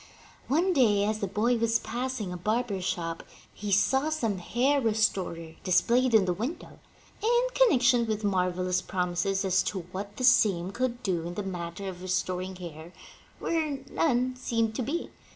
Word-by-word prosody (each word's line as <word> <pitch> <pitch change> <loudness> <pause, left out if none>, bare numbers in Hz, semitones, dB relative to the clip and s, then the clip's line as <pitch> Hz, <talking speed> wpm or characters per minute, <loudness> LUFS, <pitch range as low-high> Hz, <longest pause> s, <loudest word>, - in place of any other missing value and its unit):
One 345 +7 +2
day, 215 -9 +4
as 215 +1 0
the 200 - -1
boy 220 +5 +1
was 230 0 +2
passing 240 -7 -4
a - - -5
barber's 210 0 -1
shop, 165 -3 -2 0.3
he 205 0 -5
saw 265 +9 +3
some 225 -11 -1
hair 265 +9 +1
restorer 195 -7 0
displayed 235 +7 +3
in 210 -4 +5
the 180 - +1
window, 240 - -6 0.4
in 480 +3 +3
connection 245 - +4
with 215 -1 -2
marvelous 185 -2 0
promises 185 +2 -1
as 190 0 +3
to 190 - -3
what 200 +2 -6
the 255 - -4
same 195 -7 +4
could 245 +2 -2
do 175 -5 -1
in 175 - -6
the 205 - -3
matter 180 0 -5
of 180 -1 -7
restoring 185 0 -2
hair 170 -1 -9 0.4
where 310 -4 -1
none 255 -4 +1
seemed 230 -3 -1
to - - -1
be. 295 +8 -3
210 Hz, 165 wpm, -28 LUFS, 185-250 Hz, 0.4 s, in